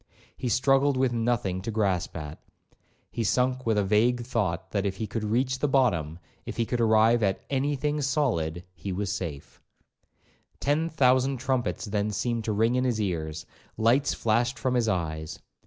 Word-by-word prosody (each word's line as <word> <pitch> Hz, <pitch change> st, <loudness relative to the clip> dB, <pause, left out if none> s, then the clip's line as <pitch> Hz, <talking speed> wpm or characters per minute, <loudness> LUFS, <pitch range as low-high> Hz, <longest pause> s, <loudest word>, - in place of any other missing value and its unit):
He 125 Hz, -, -3 dB
struggled 135 Hz, +3 st, +3 dB
with 130 Hz, -2 st, +2 dB
nothing 115 Hz, -6 st, 0 dB
to 105 Hz, -, -5 dB
grasp 100 Hz, -6 st, -1 dB
at. 75 Hz, -1 st, -7 dB, 0.7 s
He 115 Hz, -, -2 dB
sunk 125 Hz, +2 st, 0 dB
with 110 Hz, -2 st, +2 dB
a 105 Hz, -, +3 dB
vague 115 Hz, +5 st, +2 dB
thought, 100 Hz, -9 st, -2 dB
that 100 Hz, -2 st, 0 dB
if 100 Hz, -2 st, -1 dB
he 110 Hz, -, -2 dB
could 110 Hz, +2 st, -4 dB
reach 125 Hz, +4 st, 0 dB
the 150 Hz, -, +1 dB
bottom, 90 Hz, -, +1 dB, 0.3 s
if -, -, -7 dB
he 115 Hz, -, +1 dB
could 120 Hz, +2 st, -1 dB
arrive 110 Hz, +1 st, +4 dB
at 95 Hz, -2 st, 0 dB
any 140 Hz, +2 st, +1 dB
thing 150 Hz, +2 st, -1 dB
solid, 115 Hz, -, 0 dB
he 90 Hz, +3 st, -6 dB
was 100 Hz, +1 st, -2 dB
safe. 80 Hz, -8 st, -6 dB, 1.0 s
Ten 155 Hz, +4 st, +1 dB
thousand 130 Hz, -3 st, +3 dB
trumpets 130 Hz, -1 st, -1 dB
then 105 Hz, 0 st, -1 dB
seemed 115 Hz, +2 st, -2 dB
to 110 Hz, -, 0 dB
ring 110 Hz, +3 st, +2 dB
in 125 Hz, 0 st, +1 dB
his 120 Hz, -4 st, 0 dB
ears; 80 Hz, -6 st, -3 dB, 0.3 s
lights 120 Hz, +6 st, +2 dB
flashed 120 Hz, +3 st, +1 dB
from 130 Hz, -, -1 dB
his 120 Hz, -2 st, +1 dB
eyes. 80 Hz, -4 st, -3 dB
115 Hz, 175 wpm, -27 LUFS, 95-130 Hz, 1.0 s, arrive